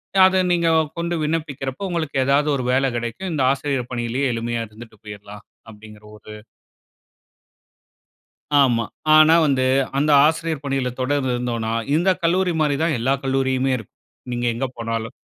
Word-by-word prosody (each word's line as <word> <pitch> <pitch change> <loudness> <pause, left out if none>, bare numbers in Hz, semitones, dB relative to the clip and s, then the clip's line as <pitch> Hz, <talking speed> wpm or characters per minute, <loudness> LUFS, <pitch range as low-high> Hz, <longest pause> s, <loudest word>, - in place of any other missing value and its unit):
ய 195 - +3
அத 190 0 +2
நீங்க 170 -1 +2 0.3
கொண்டு 170 0 -2
விண்ணப்பிக்கிறப்ப, 150 +1 -3
உங்களுக்கு 165 -5 -3
ஏதாவது 140 +2 +2
ஒரு 130 - -3
வேல 135 +1 +2
கெடைக்கும். 120 +11 -5
இந்த 140 -4 0
ஆசிரியர் 135 -2 -2
பணியிலயே 120 +3 -1
எளிமையா 115 0 -3
இருந்துட்டு 110 0 -14
போயிர்லாம், 105 0 -10 0.3
அப்பிடிங்கிற 105 0 -15
ஒரு 105 - -14 2.3
ஆமா. 120 -3 +2 0.3
ஆனா 155 +1 +7
வந்து 135 -3 +1 0.3
அந்த 150 +2 +2
ஆசிரியர் 160 -1 -1
பணியில 135 -2 -1
தொடர்ந்து 130 -1 0
இருந்தோன்னா, 115 -2 -3 0.2
இந்த 175 +4 +2
கல்லூரிமாரி 165 -4 +1
தான் 160 -4 +1
எல்லா 130 +4 +1
கல்லூரியுமே 135 0 0
இருக்கும், 110 -5 -12 0.4
நீங்க 120 0 -2
எங்க 120 +4 -2
போனாலும். 115 +1 -4
135 Hz, 135 wpm, -21 LUFS, 120-155 Hz, 2.3 s, ஆனா